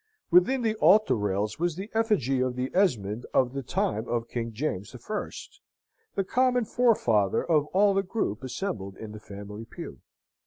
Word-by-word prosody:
Within 240 +9 +4
the 220 -1 +2
altar 215 0 +5
rails 105 +1 -1
was 175 -1 0
the 195 +5 -7
effigy 210 - +1
of 130 -1 0
the 130 +1 -2
Esmond 120 - +1
of 125 -1 +3
the 135 - -3
time 110 -2 -1
of 120 -1 -2
King 115 -1 -4
James 110 -4 -3
the - - -8
First, 210 - -6 0.5
the 195 - +1
common 250 +3 +2
forefather 120 - +2
of 150 -3 +2
all 200 +3 +3
the 195 - +2
group 180 - -2
assembled 110 - -4
in 110 -1 -8
the 105 - -9
family 105 +1 -9
pew. 115 - -9
130 Hz, 170 wpm, -27 LUFS, -, 0.5 s, altar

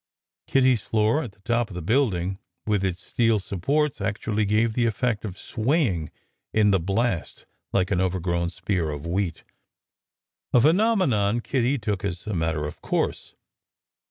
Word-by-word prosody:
Kitty 130 -1 +4
s 115 - -2
floor 110 +9 +1
at 115 -10 -7
the 100 - -29
top 120 +2 0
of 95 - -9
the 90 - -4
building, 95 - +1 0.3
with 105 -3 +1
its 90 -1 -2
steel 115 -2 +2
supports, 135 - -1
actually 110 0 -1
gave 110 +2 +2
the 120 0 +2
effect 115 0 -1
of 95 -4 -6
swaying 110 - 0 0.5
in 105 -1 +5
the 95 - +3
blast 100 +2 -1 0.3
like 95 0 +1
an 95 -2 +2
overgrown 85 -2 0
spear 85 -2 -2
of 75 +1 -5
wheat, 90 0 -2 1.1
a 125 - +7
phenome 190 - +4
non 105 -1 +1
Kitty 130 +2 0
took 105 -5 -2
as 90 -3 -3
a 105 - -3
matter 80 -3 -1
of 75 - -7
course. - - -2
105 Hz, 160 wpm, -25 LUFS, 90-120 Hz, 1.1 s, a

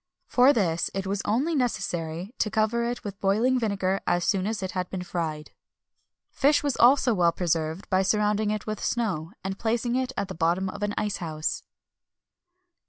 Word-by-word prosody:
For 255 +2 +5
this, 175 - +1
it 195 0 -2
was 195 +1 -1
only 260 +11 +1
necessary 195 - -2
to 215 - +1
cover 220 +2 +1
it 240 0 -3
with 205 -2 -7
boiling 225 +7 +2
vinegar 195 -4 0
as 175 0 +1
soon 195 -1 +1
as 215 -3 -2
it 185 - -3
had 180 -1 -3
been 185 -1 -4
fried.[XXI 160 -4 -4 0.8
284] 275 - +3
Fish 295 - +3
was 285 -3 0
also 250 0 +5
well 175 -4 +3
preserved 165 0 -2
by 190 0 +4
surrounding 210 +1 +1
it 215 0 -2
with 215 -1 -4
snow, 190 -9 -1
and 190 0 -4
placing 235 +1 0
it 260 0 0
at 200 - -1
the - - -6
bottom 175 +3 0
of 200 +2 -8
an 205 0 -1
ice 210 -1 -1
house. 155 -2 -3
200 Hz, 185 wpm, -26 LUFS, 180-230 Hz, 0.8 s, For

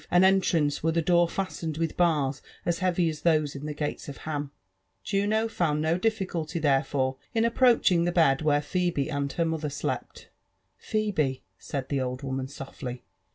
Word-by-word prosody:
an 180 +1 +5
enttanel^ 180 -6 +3
were 165 - +2
the 165 - +1
door 175 +1 +3
fastened 170 -5 -3
with 165 -1 -1
bars 150 -5 +1 0.2
as 170 -1 0
heavy 180 -2 +2
as 155 -2 -3
those 155 -4 +2
on 140 +2 -6
the 150 - -3
gates 150 0 -4
of 140 - -7
Haqi* 145 -2 -4 0.5
Juno 210 +3 +1
found 155 -8 0
bo 165 +3 +1
dilBculty 180 -7 -1
therefore 135 -2 +1 0.2
in 225 - +3
approtdiing 230 -7 +4
the 175 - +1
bM 160 -6 +3
where 145 -1 +2
Phebe 160 -2 -1
and 140 -1 -1
her 170 - +1
motlier 160 -2 -2
slept* 145 - -4 0.5
^'Pheber 185 -12 0 0.2
said 135 -2 -5
the 140 -2 0
old 130 +1 -3
woman 130 -1 -3
softly. 130 -2 -7
160 Hz, 170 wpm, -27 LUFS, 145-180 Hz, 0.5 s, an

